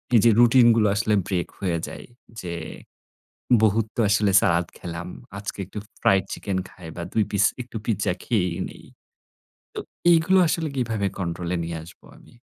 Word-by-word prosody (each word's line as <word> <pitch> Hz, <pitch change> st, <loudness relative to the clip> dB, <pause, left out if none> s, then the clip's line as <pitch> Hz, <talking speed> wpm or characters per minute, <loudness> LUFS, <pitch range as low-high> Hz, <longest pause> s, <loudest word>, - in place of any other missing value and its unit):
এই -, -, +8 dB
যে -, -, +8 dB
রুটিন 120 Hz, 0 st, +6 dB
গুলো 110 Hz, -2 st, +3 dB
আসলে 110 Hz, +1 st, +1 dB
ব্রেক 90 Hz, -3 st, -1 dB
হয়ে 90 Hz, -4 st, -1 dB
যায় -, -, -9 dB, 0.4 s
যে 85 Hz, -2 st, -5 dB, 1.1 s
বহুত 110 Hz, 0 st, +3 dB
তো 120 Hz, -, +1 dB
আসলে 100 Hz, 0 st, +3 dB
সালাদ 85 Hz, -1 st, +2 dB
খেলাম। 85 Hz, 0 st, -6 dB, 0.3 s
আজকে 100 Hz, -, -6 dB
একটু 100 Hz, +3 st, -7 dB, 0.2 s
ফ্রাইড 95 Hz, -1 st, +4 dB
চিকেন 95 Hz, -2 st, -3 dB
খাই 90 Hz, -3 st, -12 dB
বা 85 Hz, -, -4 dB
২ 110 Hz, -, +3 dB
পিস 100 Hz, 0 st, +3 dB, 0.2 s
একটু 120 Hz, -2 st, -7 dB
পিজ্জা 100 Hz, -5 st, 0 dB
খেয়েই 90 Hz, -8 st, 0 dB
নেই। -, -, -14 dB, 0.9 s
তো -, -, -5 dB, 0.3 s
এগুলো 170 Hz, +3 st, +4 dB
আসলে 160 Hz, 0 st, -1 dB
কিভাবে 115 Hz, -6 st, -1 dB
কন্ট্রোল 85 Hz, -1 st, -3 dB
নিয়ে 85 Hz, 0 st, -4 dB
আসবো 85 Hz, +3 st, -16 dB
আমি? -, -, -19 dB
100 Hz, 165 wpm, -24 LUFS, 90-115 Hz, 1.1 s, এই